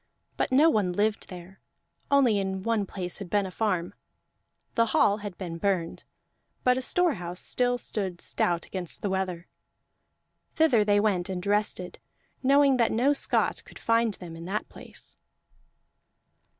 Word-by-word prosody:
But - - -1
no 285 +5 +6
one 205 - +2
lived 210 +3 0
there, 180 +1 -11 0.5
only 260 -7 +4
in 190 -1 -3
one 225 -3 0
place 180 -1 -5
had 195 -3 -7
been 205 0 +1
a 190 - -6
farm; 185 -4 -1 0.8
the 230 0 +2
hall 205 0 +4
had 205 -4 -7
been 170 -3 -6
burned, 180 -3 -1 0.6
but 250 0 +4
a 260 - -2
storehouse 205 - 0
still 245 0 +1
stood 190 -6 -4
stout 175 0 0
against 180 -3 -5
the 200 - -1
weather. 185 -3 -3 1.1
Thither 275 -9 +4
they 205 0 +3
went 195 -4 0
and 185 0 -4
rested, 205 -3 -1 0.4
knowing 275 0 +4
that 235 -2 +2
no 255 +6 +3
Scot 280 - +1
could - - -14
find 230 -2 +1
them 170 -3 -9
in 165 +1 -9
that 200 +4 -3
place. - - -12
205 Hz, 150 wpm, -27 LUFS, 180-230 Hz, 1.1 s, no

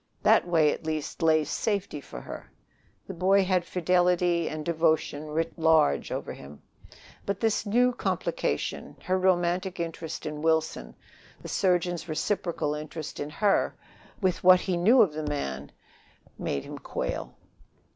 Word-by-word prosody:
That - - +4
way, 160 -4 +3
at - - -8
least, 155 0 -4
lay 160 -1 +4
safety 195 0 -2
for - - -9
her. - - -9 0.5
The 195 - -7
boy 190 +3 +3
had 185 -1 +1
fidelity 180 -1 +2
and 155 -1 -5
devotion 160 -2 0
written 165 +2 -3
large 160 - +3
over - - -4
him. 70 +1 -12 0.6
But 200 0 -3
this 225 -1 0
new 245 +4 +3
complication - - -2
her 185 - 0
romantic 180 0 +1
interest 165 -1 -5
in 150 -1 -5
Wilson, 160 0 0 0.4
the - - -9
surgeon's 175 -2 0
reciprocal 160 -2 -1
interest 155 +1 -6
in 145 - -3
her, 200 +6 +1 0.4
with 185 -5 0
what 185 0 +7
he 185 - -1
knew 220 +9 +6
of 175 -7 -1
the 155 - -4
man 70 - -4 0.7
made 70 - -2
him - - -8
quail. - - -4
170 Hz, 145 wpm, -27 LUFS, 155-185 Hz, 0.7 s, what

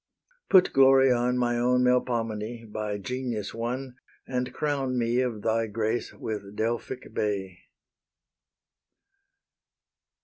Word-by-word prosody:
Put 185 -2 +6
glory 135 -1 +6
on, 125 +1 +1
My 120 -1 +1
own 125 +1 +3
Melpomene, 115 -3 -1
by 105 -1 -3
genius 120 -1 -4
won, 125 +3 -4 0.3
And 125 -1 -2
crown 135 -2 -1
me 120 +1 +1
of 120 -5 -2
thy 115 0 +1
grace 110 +2 -2
with 105 -2 -6
Delphic 120 +3 -3
bay. 95 -3 -2
120 Hz, 105 wpm, -27 LUFS, 110-125 Hz, 0.3 s, Put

